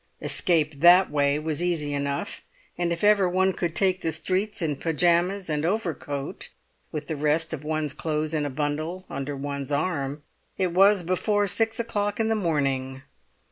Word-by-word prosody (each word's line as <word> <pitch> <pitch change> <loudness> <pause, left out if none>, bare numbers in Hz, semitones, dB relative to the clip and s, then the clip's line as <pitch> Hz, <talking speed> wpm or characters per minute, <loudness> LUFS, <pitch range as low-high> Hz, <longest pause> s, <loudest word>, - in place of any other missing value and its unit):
Escape 160 -4 +1
that 175 +4 +6
way 145 -1 +2
was 155 0 -3
easy 165 -5 0
enough; 140 +8 -3 0.3
and 175 -1 -1
if 170 +2 -3
ever 205 -3 +5
one 190 +1 +2
could 170 -2 -3
take 185 -2 +2
the 165 - -1
streets 185 +6 -1
in 155 -4 -1
pyjamas 175 +5 +1
and 150 -1 -1
overcoat, 160 -7 -3 0.4
with 150 -1 -4
the 155 - -3
rest 155 +2 +1
of 150 -2 -5
one's 155 -2 -2
clothes 155 0 -2
in 155 -2 0
a 145 - -2
bundle 155 +6 -3
under 140 +1 -4
one's 140 0 -4
arm, 145 -2 -1 0.3
it 185 -2 0
was 195 +1 +5
before 205 +4 +1
six 225 +3 0
o'clock 205 -3 -2
in 220 0 +1
the 225 - +2
morning. 135 -8 -1
160 Hz, 170 wpm, -25 LUFS, 145-185 Hz, 0.4 s, that